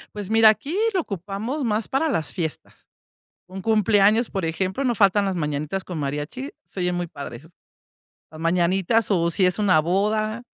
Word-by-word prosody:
Pues 205 Hz, -1 st, -6 dB
mira, 225 Hz, 0 st, +7 dB
aquí 280 Hz, +9 st, -1 dB, 0.2 s
lo 370 Hz, -, +2 dB
ocupamos 205 Hz, -, -4 dB
más 215 Hz, -1 st, -1 dB
para 295 Hz, +4 st, 0 dB
las 160 Hz, -, -2 dB
fiestas. 160 Hz, -3 st, -6 dB, 0.6 s
Un 190 Hz, +1 st, -8 dB
cumpleaños, 215 Hz, +1 st, +3 dB
por 190 Hz, -4 st, -3 dB
ejemplo, 190 Hz, +9 st, -2 dB
no 245 Hz, -3 st, +1 dB
faltan 200 Hz, -1 st, +3 dB
las 190 Hz, -, -1 dB
mañanitas 150 Hz, +3 st, -2 dB
con 175 Hz, -3 st, -6 dB
mariachi, 150 Hz, -, -4 dB
se 190 Hz, -, -9 dB
oyen 180 Hz, 0 st, 0 dB
muy 175 Hz, 0 st, -2 dB
padre. 140 Hz, -6 st, -8 dB, 0.9 s
Las 155 Hz, 0 st, -10 dB
mañanitas, 180 Hz, +6 st, +1 dB
o 170 Hz, -3 st, +2 dB
si 185 Hz, +2 st, +2 dB
es 180 Hz, +3 st, +1 dB
una 190 Hz, -6 st, +4 dB
boda, 215 Hz, +7 st, 0 dB
195 Hz, 170 wpm, -23 LUFS, 170-220 Hz, 0.9 s, mira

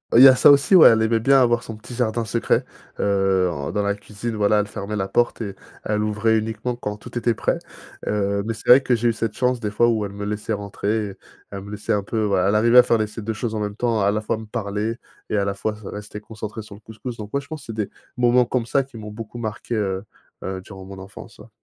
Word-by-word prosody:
Il 120 Hz, -, +9 dB
y -, -, +12 dB
a 130 Hz, -, +8 dB
ça -, -, +6 dB
aussi, 145 Hz, +6 st, +5 dB
ouais, 175 Hz, -, +10 dB
elle 110 Hz, 0 st, +3 dB
aimait 115 Hz, 0 st, +2 dB
bien 135 Hz, +4 st, +5 dB
avoir 120 Hz, -2 st, +3 dB
son 110 Hz, -2 st, -8 dB
petit 110 Hz, +3 st, -11 dB
jardin 115 Hz, -1 st, -1 dB
secret, 115 Hz, +2 st, 0 dB, 0.3 s
heu, 95 Hz, -2 st, +2 dB
en 70 Hz, -4 st, -4 dB
dans 105 Hz, -, -1 dB
la 100 Hz, 0 st, +1 dB
cuisine, 105 Hz, +3 st, -6 dB
voilà, 105 Hz, 0 st, +3 dB
elle 105 Hz, -, +1 dB
fermait 105 Hz, 0 st, -5 dB
la 95 Hz, -2 st, -1 dB
porte 120 Hz, +3 st, +1 dB
et 100 Hz, -3 st, -5 dB, 0.3 s
elle 105 Hz, 0 st, 0 dB
ouvrait 105 Hz, +1 st, +1 dB
uniquement 110 Hz, +3 st, -3 dB
quand 105 Hz, -3 st, -5 dB
tout 105 Hz, -, -13 dB
était 120 Hz, -1 st, +1 dB
prêt. -, -, -1 dB, 0.5 s
Heu, 100 Hz, -1 st, 0 dB
mais 115 Hz, +2 st, -3 dB
c'est 105 Hz, -, -13 dB
vrai 125 Hz, +2 st, +9 dB
que 130 Hz, -2 st, +2 dB
j'ai 120 Hz, +1 st, +1 dB
eu -, -, +1 dB
cette 110 Hz, -1 st, -3 dB
chance, 125 Hz, -1 st, +1 dB
des 105 Hz, -3 st, -2 dB
fois, 105 Hz, +3 st, +3 dB
où 110 Hz, -2 st, +1 dB
elle 100 Hz, -, -7 dB
me 100 Hz, 0 st, -5 dB
laissait 105 Hz, +1 st, -3 dB
rentrer, 105 Hz, 0 st, -2 dB, 0.4 s
elle 100 Hz, -1 st, -6 dB
me 100 Hz, -, -10 dB
laissait 105 Hz, +1 st, -2 dB
un 105 Hz, -, +1 dB
peu, 110 Hz, +2 st, -2 dB
voilà, 100 Hz, -2 st, +2 dB
elle 105 Hz, -, +2 dB
arrivait 115 Hz, +3 st, +6 dB
à -, -, +9 dB
faire 115 Hz, -, +2 dB
les 110 Hz, -, +1 dB
ces 105 Hz, +2 st, -8 dB
2 110 Hz, +2 st, -3 dB
choses 110 Hz, +1 st, -3 dB
en 110 Hz, -, -2 dB
même 105 Hz, -1 st, -3 dB
temps, 115 Hz, -1 st, 0 dB
à 100 Hz, -, +3 dB
la 105 Hz, +1 st, -1 dB
fois 110 Hz, -, -2 dB
me 110 Hz, -, -8 dB
parler 105 Hz, +1 st, -3 dB, 0.3 s
et 105 Hz, -, 0 dB
à 100 Hz, -, +1 dB
la 100 Hz, -, -1 dB
fois 105 Hz, +2 st, -3 dB
se 105 Hz, -1 st, -14 dB
rester 105 Hz, 0 st, -7 dB
concentrée 110 Hz, +1 st, -7 dB
sur 105 Hz, -, -12 dB
le 100 Hz, -, -13 dB
couscous. 110 Hz, +3 st, -8 dB
Donc 105 Hz, -1 st, -7 dB
ouais, 140 Hz, -, +1 dB
je -, -, -15 dB
pense 155 Hz, 0 st, -7 dB
que -, -, -14 dB
c'est 115 Hz, -, -5 dB
des -, -, -25 dB, 0.3 s
moments 125 Hz, 0 st, +4 dB
comme 120 Hz, -1 st, -1 dB
ça 135 Hz, +4 st, +2 dB
qui 130 Hz, -3 st, -13 dB
m'ont 105 Hz, -1 st, -8 dB
beaucoup 110 Hz, +2 st, -8 dB
marqué, 115 Hz, +1 st, -4 dB
heu, 95 Hz, -3 st, -1 dB, 0.4 s
heu, 95 Hz, 0 st, -4 dB
durant 95 Hz, 0 st, -11 dB
mon 95 Hz, 0 st, -10 dB
enfance, 95 Hz, +1 st, -11 dB
ouais. -, -, -14 dB
110 Hz, 275 wpm, -22 LUFS, 100-115 Hz, 0.5 s, y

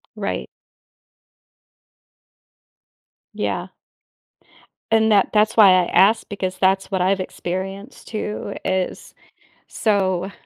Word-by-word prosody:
Right. -, -, -4 dB, 2.9 s
Yeah. -, -, -3 dB, 1.2 s
And 220 Hz, 0 st, +3 dB
that 200 Hz, -2 st, +3 dB
that's 215 Hz, 0 st, +2 dB
why 205 Hz, -4 st, +8 dB
I 185 Hz, -1 st, +4 dB
asked 200 Hz, +6 st, +3 dB
because 190 Hz, -3 st, -4 dB
that's 190 Hz, +1 st, +1 dB
what 190 Hz, -2 st, 0 dB
I've 190 Hz, +1 st, +1 dB
experienced 195 Hz, +5 st, -6 dB
too, 210 Hz, -2 st, -5 dB
is 185 Hz, -1 st, -3 dB, 0.5 s
so 190 Hz, -3 st, 0 dB
195 Hz, 90 wpm, -21 LUFS, 185-210 Hz, 2.9 s, why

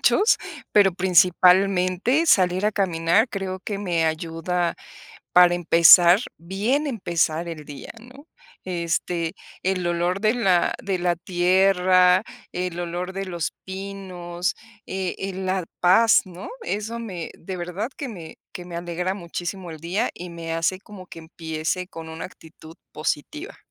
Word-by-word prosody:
muchos, 420 Hz, +4 st, +4 dB, 0.3 s
pero 200 Hz, -2 st, +5 dB
principalmente 185 Hz, -, +3 dB
salir 185 Hz, -, +3 dB
a 215 Hz, -, +1 dB
caminar 190 Hz, +3 st, +2 dB
creo 190 Hz, -3 st, -4 dB
que 205 Hz, -2 st, -3 dB
me 175 Hz, -5 st, 0 dB
ayuda, 165 Hz, +2 st, -1 dB, 0.6 s
para 180 Hz, -1 st, +7 dB
empezar, 175 Hz, +1 st, +7 dB, 0.2 s
bien 210 Hz, -, -1 dB
empezar 170 Hz, -, -1 dB
el 160 Hz, -3 st, -7 dB
día, 145 Hz, -1 st, -10 dB
¿no?, 265 Hz, +6 st, -15 dB, 0.4 s
este, 170 Hz, -1 st, -2 dB, 0.3 s
el 185 Hz, -1 st, 0 dB
olor 175 Hz, +2 st, 0 dB
de 215 Hz, 0 st, +3 dB
la 185 Hz, -7 st, +2 dB
de 195 Hz, -2 st, -1 dB
la 175 Hz, 0 st, +1 dB
tierra, 185 Hz, +1 st, +3 dB, 0.3 s
el 180 Hz, -1 st, -4 dB
olor 175 Hz, +2 st, -4 dB
de 195 Hz, +1 st, -3 dB
los 175 Hz, -4 st, -3 dB
pinos, 190 Hz, -2 st, -5 dB, 0.3 s
eh, 190 Hz, -1 st, -3 dB
eh, 195 Hz, 0 st, -4 dB
la 185 Hz, 0 st, -2 dB, 0.2 s
paz, 205 Hz, +6 st, +5 dB
¿no?, 180 Hz, 0 st, -9 dB
eso 220 Hz, -, -3 dB
me 185 Hz, -8 st, -6 dB
de 190 Hz, +2 st, -7 dB
verdad, 180 Hz, +6 st, -4 dB
que 280 Hz, -4 st, -5 dB
me 170 Hz, -7 st, -10 dB
que 180 Hz, -, -8 dB
me 175 Hz, -1 st, -8 dB
alegra 175 Hz, +2 st, -3 dB
muchísimo 175 Hz, 0 st, -6 dB
el 160 Hz, -, -8 dB
día, 175 Hz, +6 st, -1 dB
y 180 Hz, 0 st, -8 dB
me 165 Hz, -1 st, -5 dB
hace 165 Hz, +3 st, 0 dB
como 200 Hz, -4 st, -12 dB
que 165 Hz, -, -10 dB
empiece 160 Hz, +2 st, -4 dB
con 165 Hz, -3 st, -9 dB
una 160 Hz, 0 st, -6 dB
actitud 160 Hz, -2 st, -15 dB, 0.2 s
positiva. 230 Hz, -, -4 dB
180 Hz, 145 wpm, -23 LUFS, 170-195 Hz, 0.6 s, para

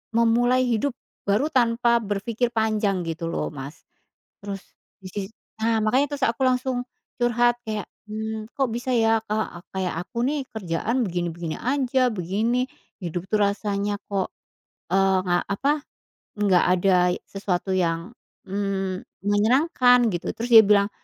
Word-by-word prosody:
memulai 240 Hz, +2 st, +4 dB
hidup 245 Hz, +3 st, +1 dB, 0.4 s
baru 210 Hz, +9 st, +2 dB
tanpa 235 Hz, -2 st, +3 dB
berpikir 215 Hz, +4 st, -1 dB
panjang 215 Hz, -4 st, +1 dB
gitu 165 Hz, 0 st, -3 dB
loh, -, -, -2 dB
Mas. 140 Hz, 0 st, -9 dB, 0.6 s
Terus 195 Hz, -1 st, -5 dB, 0.4 s
disi 190 Hz, +1 st, -5 dB, 0.3 s
nah, 225 Hz, 0 st, +1 dB
makanya 255 Hz, +7 st, +2 dB
terus 265 Hz, -, +2 dB
aku 235 Hz, +3 st, -1 dB
langsung 255 Hz, 0 st, +1 dB, 0.4 s
curhat 240 Hz, 0 st, +2 dB
kayak, 215 Hz, -2 st, -4 dB, 0.2 s
"Mmm, 220 Hz, 0 st, -4 dB
kok 270 Hz, -, +3 dB
bisa 245 Hz, +2 st, -3 dB
ya, 225 Hz, -2 st, +3 dB
Kak, 215 Hz, -5 st, -3 dB
kayak 185 Hz, -3 st, -2 dB
aku 235 Hz, +6 st, -2 dB
nih 290 Hz, 0 st, 0 dB
kerjaan 220 Hz, +5 st, -1 dB
begini-begini 170 Hz, -2 st, -3 dB
aja, 255 Hz, -1 st, +1 dB
begini, 220 Hz, +6 st, 0 dB, 0.3 s
hidup 175 Hz, -2 st, -4 dB
tuh 215 Hz, -, +2 dB
rasanya 205 Hz, 0 st, 0 dB, 0.2 s
kok, 195 Hz, -2 st, -1 dB, 0.5 s
eee, 190 Hz, +1 st, +3 dB
nggak, 175 Hz, -1 st, 0 dB
apa, 275 Hz, +8 st, +1 dB, 0.6 s
nggak 200 Hz, -4 st, +3 dB
ada 185 Hz, +1 st, +3 dB, 0.3 s
sesuatu 195 Hz, -1 st, -2 dB
yang, 170 Hz, 0 st, 0 dB, 0.3 s
mmm, 195 Hz, -1 st, -3 dB, 0.2 s
menyenangkan 245 Hz, +3 st, +4 dB
gitu," 175 Hz, -3 st, -3 dB
terus 235 Hz, +2 st, -4 dB
dia 220 Hz, -3 st, +9 dB
bilang, 200 Hz, 0 st, +4 dB
215 Hz, 135 wpm, -24 LUFS, 190-240 Hz, 0.6 s, dia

